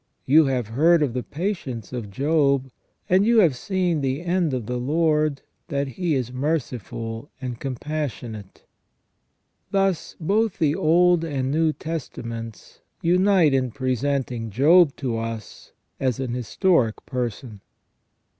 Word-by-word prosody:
You 155 +4 +6
have 125 -5 -1
heard 155 +7 +4
of 135 -5 -1
the 125 - -2
patience 145 - -4
of 115 -5 -5
Job, 140 +2 +1 0.4
and 185 +2 +4
you 230 +2 +3
have 160 -9 +3
seen 180 +1 -1
the 135 +4 -1
end 175 -2 +1
of 125 -4 -3
the 125 +3 -3
Lord, 150 +1 +1 0.2
that 140 -1 -2
He 165 +3 -1
is 125 -2 -2
merciful 125 - -3
and 125 -2 -5
compassionate." 125 -7 -5 1.0
Thus, 195 -3 0
both 205 +5 +1
the 155 -4 +2
Old 175 0 +3
and 135 -5 -2
New 160 +1 +2
Testaments 115 -9 -7 0.2
unite 180 -3 +4
in 130 -1 +1
presenting 130 -2 -2
Job 150 - +5
to 120 -5 -2
us 115 -1 -7 0.3
as 130 -3 0
an 130 -3 -3
historic 125 - +1
person. 120 -4 -4
140 Hz, 130 wpm, -23 LUFS, 125-165 Hz, 1.0 s, You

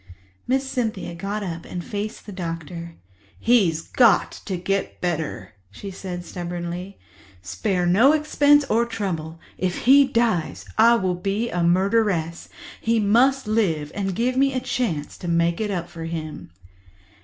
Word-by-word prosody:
Miss 265 +1 +1
Cynthia 225 -9 -3
got 200 +5 -4
up 165 -3 -5
and 175 -1 -6
faced 210 +1 -5
the 210 - -8
doctor. 170 -2 -6 0.4
"He's 185 -10 +3
got 235 -4 +3
to 190 -3 -2
get 195 +3 -2
better," 155 - -3 0.2
she 195 - -8
said 180 -2 -6
stubbornly. 175 +2 -5 0.5
"Spare 180 - -1
no 210 +11 +5
expense 290 -1 +4
or 235 -2 +1
trouble. 165 -8 -4 0.2
If 185 -1 -2
he 275 +2 +7
dies, 230 -10 0
I 230 +2 +6
will 185 -5 0
be 195 +6 -2
a 175 - -1
murderess. 180 -1 +1 0.3
He 230 0 +2
must 245 +6 +3
live 180 -9 0
and 195 -2 -2
give 250 +4 0
me 270 +1 +3
a - - +1
chance 235 - -3
to 175 - -6
make 170 +2 +1
it 215 - -1
up 175 -4 -3
for 165 -2 -8
him." 160 -2 -6
190 Hz, 150 wpm, -23 LUFS, 170-230 Hz, 0.5 s, he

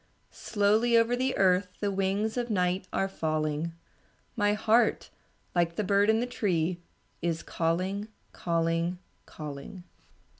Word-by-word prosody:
Slowly 220 +3 +2
over 230 +1 +3
the 260 +1 -1
earth 185 0 +3
The 205 -1 0
wings 195 +3 0
of 245 -1 -2
night 185 -2 0
are 195 - 0
falling; 155 -2 -2 0.6
My 205 -3 +2
heart 220 +3 +2 0.4
like 170 -1 +1
the 215 - -1
bird 200 +1 +3
in 220 0 +4
the 240 - 0
tree 180 -7 -1 0.4
Is 170 -1 -1
calling, 185 +5 -1 0.2
calling, 165 +1 0 0.3
calling. 150 +5 -8
190 Hz, 125 wpm, -29 LUFS, 170-215 Hz, 0.6 s, in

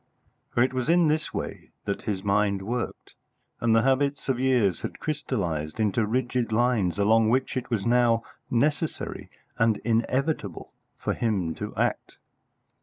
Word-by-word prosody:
For 120 - +2
it 130 - 0
was 130 +3 -1
in 170 -2 +5
this 155 0 0
way - - -5 0.2
that 100 - -2
his 100 -3 -3
mind 100 -1 +1
worked, 120 +4 -4 0.5
and 115 -1 +3
the 115 - +4
habits 140 +2 +1
of 130 -2 +1
years 125 -9 +2
had - - -5
crystallised 100 - -3
into 110 0 +1
rigid 125 0 0
lines 110 -7 +2
along 110 +2 +4
which 130 +3 +1
it 130 0 -3
was 110 -5 -1
now 120 -1 +3 0.3
necessary 150 +6 -1 0.3
and 115 -2 +3
inevitable 115 - -1 0.2
for - - -1
him 100 -8 -1
to - - -6
act. - - -1
115 Hz, 150 wpm, -26 LUFS, 105-130 Hz, 0.5 s, in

